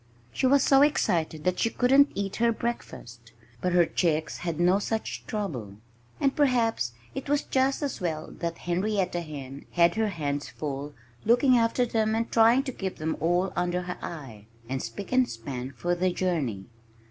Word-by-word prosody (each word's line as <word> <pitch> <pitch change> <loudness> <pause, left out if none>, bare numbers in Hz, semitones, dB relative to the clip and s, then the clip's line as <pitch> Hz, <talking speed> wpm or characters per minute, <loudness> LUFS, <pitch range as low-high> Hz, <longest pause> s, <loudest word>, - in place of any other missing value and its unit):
She 260 - +1
was 275 +1 +5
so 275 0 +5
excited 165 - +1
that 180 0 0
she 230 - +2
couldn't 270 +4 +4
eat 195 -1 -3
her 235 0 +3
breakfast. 120 - -6 0.3
But 180 - 0
her 175 -1 +5
chicks 160 -2 0
had 170 -2 -3
no 180 +3 +4
such 220 +2 -3
trouble. 135 - -4 0.4
And 275 -1 +1
perhaps 235 - +2 0.2
it - - -6
was 290 0 +2
just 265 +2 +1
as 280 - -3
well 160 -3 -3
that 170 -1 -3
Henrietta 185 0 -1
Hen 140 -4 -8
had 170 -1 +4
her 220 0 +1
hands 145 -5 -3
full 145 -1 -5 0.3
looking 245 +3 +4
after 235 +1 +2
them 220 -2 0
and 230 +1 -1
trying 230 +3 +5
to 270 - -4
keep 195 -6 -4
them 160 +1 -2
all 175 +3 +1
under 180 0 0
her 180 0 -6
eye, 120 -11 -8 0.2
and 130 +1 -2
spick 115 +13 -7
and 255 -1 +3
span 125 +3 -6
for 175 +7 -2
the 180 +1 +1
journey. 155 - -1
180 Hz, 175 wpm, -27 LUFS, 155-230 Hz, 0.4 s, was